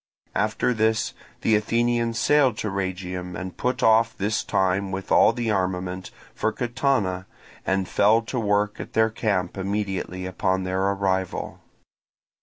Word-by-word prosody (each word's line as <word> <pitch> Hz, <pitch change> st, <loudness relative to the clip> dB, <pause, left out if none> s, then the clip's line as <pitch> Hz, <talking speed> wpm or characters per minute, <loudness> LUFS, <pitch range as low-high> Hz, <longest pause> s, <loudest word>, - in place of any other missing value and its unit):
After 125 Hz, -, +1 dB
this 110 Hz, -1 st, +1 dB, 0.3 s
the 110 Hz, -, +3 dB
Athenians 115 Hz, +2 st, +1 dB
sailed 135 Hz, -4 st, +3 dB
to 105 Hz, -, -2 dB
Rhegium, 90 Hz, -2 st, -4 dB
and 90 Hz, +2 st, -6 dB
put 125 Hz, 0 st, -1 dB
off, 115 Hz, +1 st, +4 dB
this 105 Hz, +2 st, 0 dB
time 95 Hz, +1 st, 0 dB
with 95 Hz, 0 st, -5 dB
all -, -, +6 dB
the 120 Hz, -2 st, -2 dB
armament, 90 Hz, -1 st, -2 dB, 0.2 s
for -, -, 0 dB
Catana, 120 Hz, -7 st, 0 dB, 0.4 s
and 95 Hz, -1 st, +1 dB
fell 110 Hz, +3 st, +3 dB
to 125 Hz, +2 st, -3 dB
work 105 Hz, -1 st, +1 dB
at -, -, -7 dB
their 110 Hz, 0 st, +3 dB
camp 100 Hz, -5 st, -1 dB
immediately 95 Hz, -2 st, -2 dB
upon 95 Hz, 0 st, 0 dB
their 95 Hz, 0 st, -1 dB
arrival. 95 Hz, -2 st, -1 dB
100 Hz, 140 wpm, -24 LUFS, 95-110 Hz, 0.4 s, all